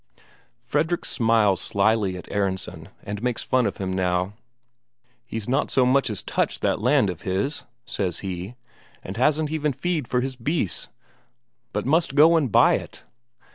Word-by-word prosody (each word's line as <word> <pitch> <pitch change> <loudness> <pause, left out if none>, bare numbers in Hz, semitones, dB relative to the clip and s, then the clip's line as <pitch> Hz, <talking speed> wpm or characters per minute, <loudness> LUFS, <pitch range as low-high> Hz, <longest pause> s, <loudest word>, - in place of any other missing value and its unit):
Fredrik 160 +4 -1
smiles 110 -5 +2
slyly 100 -2 +1
at 90 - -10
Aronsen, 95 -2 -3
and 100 +1 -5
makes 125 -1 -1
fun 130 -2 +2
of - - -4
him 95 -1 -3
now. 90 +1 0 0.9
"He's 110 -2 -5
not 130 - +1
so 130 - +3
much 135 +1 +3
as 105 - -4
touched - - -1
that - - +1
land 125 -4 +3
of 90 - -10
his," 100 +10 -2 0.2
says 90 -8 -3
he, 95 +3 -5 0.5
"and 95 - -7
hasn't 150 +4 +2
even 150 -2 0
feed 160 -2 -2
for 125 +1 +1
his 130 0 -3
beasts, 125 - -1 0.8
but - - -2
must 155 0 +1
go 160 +3 +7
and 145 -8 +1
buy - - +5
it. - - -10
115 Hz, 160 wpm, -24 LUFS, 95-140 Hz, 0.9 s, go